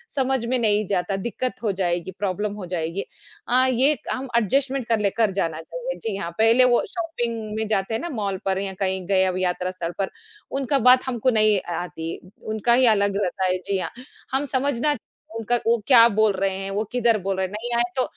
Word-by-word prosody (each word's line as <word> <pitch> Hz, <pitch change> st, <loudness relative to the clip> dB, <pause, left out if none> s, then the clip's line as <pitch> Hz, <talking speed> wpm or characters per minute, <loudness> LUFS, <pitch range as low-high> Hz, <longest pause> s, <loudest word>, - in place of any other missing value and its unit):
समझ 265 Hz, -3 st, +1 dB
में 255 Hz, +2 st, +1 dB
नहीं 210 Hz, -2 st, +2 dB
जाता, 195 Hz, 0 st, 0 dB
दिक्कत 250 Hz, +2 st, -3 dB
हो 215 Hz, -, +2 dB
जाएगी, 175 Hz, +1 st, -1 dB
प्रॉब्लम 205 Hz, +1 st, -1 dB
हो 205 Hz, -3 st, -7 dB
जाएगी। 175 Hz, +1 st, -3 dB, 0.4 s
अ, 255 Hz, +2 st, +4 dB
ये 270 Hz, +4 st, +3 dB
हम 265 Hz, +1 st, -3 dB
एडजस्टमेंट 260 Hz, +3 st, 0 dB
कर 225 Hz, -2 st, +2 dB
ले 200 Hz, -1 st, +2 dB
कर 220 Hz, -1 st, +1 dB
जाना 165 Hz, -4 st, -2 dB
चाहिए। -, -, -5 dB
जी 220 Hz, -3 st, -2 dB
हाँ, 170 Hz, -3 st, -4 dB
पहले 225 Hz, +3 st, +5 dB
वो 245 Hz, -1 st, +3 dB
शॉपिंग 235 Hz, -11 st, -3 dB
में 220 Hz, -, -1 dB
जाते 210 Hz, 0 st, -1 dB
हैं 225 Hz, -, -1 dB
ना 345 Hz, -, -4 dB
मॉल 200 Hz, -7 st, -2 dB
पर 190 Hz, 0 st, +1 dB
या 195 Hz, -1 st, -3 dB
कहीं 190 Hz, -1 st, -1 dB
गए 190 Hz, -1 st, +3 dB
अब 185 Hz, -1 st, -1 dB
यात्रा 180 Hz, 0 st, -1 dB
सर 175 Hz, -2 st, -4 dB
पर, 195 Hz, -, 0 dB, 0.4 s
उनका 275 Hz, +1 st, 0 dB
बात 255 Hz, +1 st, +6 dB
हमको 245 Hz, 0 st, +1 dB
नहीं 215 Hz, -4 st, +3 dB
अ 175 Hz, -, -8 dB
आती, 165 Hz, -1 st, -6 dB, 0.3 s
उनका 220 Hz, +2 st, +1 dB
ही 255 Hz, +1 st, +5 dB
अलग 200 Hz, -2 st, +3 dB
रहता 190 Hz, +1 st, -2 dB
है, -, -, +2 dB
जी 195 Hz, +2 st, -2 dB
हाँ। 180 Hz, -, -4 dB, 0.4 s
हम 270 Hz, +2 st, 0 dB
समझना 280 Hz, +2 st, 0 dB, 0.4 s
उनका 225 Hz, +2 st, 0 dB
वो 235 Hz, +1 st, +4 dB
क्या 235 Hz, -4 st, +8 dB
बोल 215 Hz, 0 st, +3 dB
रहे 190 Hz, 0 st, -1 dB
हैं, 195 Hz, 0 st, -4 dB
वो 205 Hz, +2 st, 0 dB
किधर 235 Hz, -2 st, +3 dB
बोल 195 Hz, +1 st, -1 dB
रहे 190 Hz, -, +1 dB
हैं, 185 Hz, -, -7 dB
नहीं 235 Hz, +3 st, -4 dB
आए 235 Hz, -, +4 dB
तो 255 Hz, -, +2 dB
215 Hz, 220 wpm, -23 LUFS, 190-245 Hz, 0.4 s, क्या